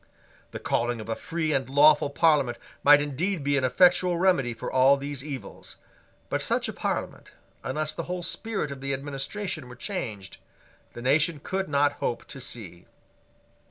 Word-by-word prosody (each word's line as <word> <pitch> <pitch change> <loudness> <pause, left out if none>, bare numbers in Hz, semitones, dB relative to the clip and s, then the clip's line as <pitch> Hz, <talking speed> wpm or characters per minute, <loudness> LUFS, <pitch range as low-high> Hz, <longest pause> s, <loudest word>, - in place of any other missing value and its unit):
The - - -7
calling 120 0 -1
of 110 +1 -8
a 115 - 0
free 160 +2 -2
and 130 -3 -1
lawful 145 +1 +5
Parliament 140 -5 +2 0.3
might 145 0 +7
indeed 155 +4 -2
be 145 0 +1
an 140 - +1
effectual 175 +6 +4
remedy 170 -9 +2
for 115 - -6
all 130 +2 +5
these 140 -1 -5
evils: 140 -3 -8 0.5
but - - -1
such - - 0
a - - -5
Parliament, - - -3 0.4
unless 155 +3 -2
the 165 - -5
whole 180 -1 -3
spirit 195 -3 -3
of 135 -1 -8
the 135 0 -1
administration 140 +3 -5
were 125 - -10
changed, 115 - -5 0.6
the 120 - -8
nation 150 +4 +2
could 190 -2 -2
not 145 0 +3
hope 120 - -2
to 135 - -8
see. 90 -9 -6
140 Hz, 165 wpm, -26 LUFS, 130-165 Hz, 0.6 s, might